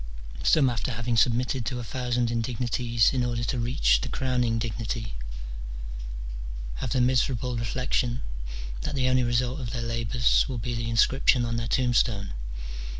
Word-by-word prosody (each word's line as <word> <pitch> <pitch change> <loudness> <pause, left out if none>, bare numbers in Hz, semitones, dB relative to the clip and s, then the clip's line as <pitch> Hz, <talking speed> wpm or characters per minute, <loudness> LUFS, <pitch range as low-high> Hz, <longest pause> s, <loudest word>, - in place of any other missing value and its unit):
some 145 -4 +5
after 120 +1 -1
having 120 +1 -1
snbmitted 125 +2 +2
to 125 +3 -2
a - - -4
thousand 120 0 -1
indignities 120 0 +1
in 130 -2 +1
order 120 -1 -1
to 120 +1 -1
reach - - +3
the - - -3
crowning 125 -3 +1
dignity, 115 - -3 1.6
have - - -3
the 130 - +1
miserable 125 0 +2
reflexion 120 +1 0 0.6
that - - -3
the 130 -2 +2
only 130 0 +4
result 125 +2 +1
of 125 -4 -4
their 120 0 -3
labours 115 +2 +2
will 130 - -3
be 120 +2 -2
the 115 0 -2
inscription 120 +1 +4
on 115 0 -1
their 115 0 -2
tombstone. 120 -5 +2
120 Hz, 150 wpm, -27 LUFS, 115-125 Hz, 1.6 s, some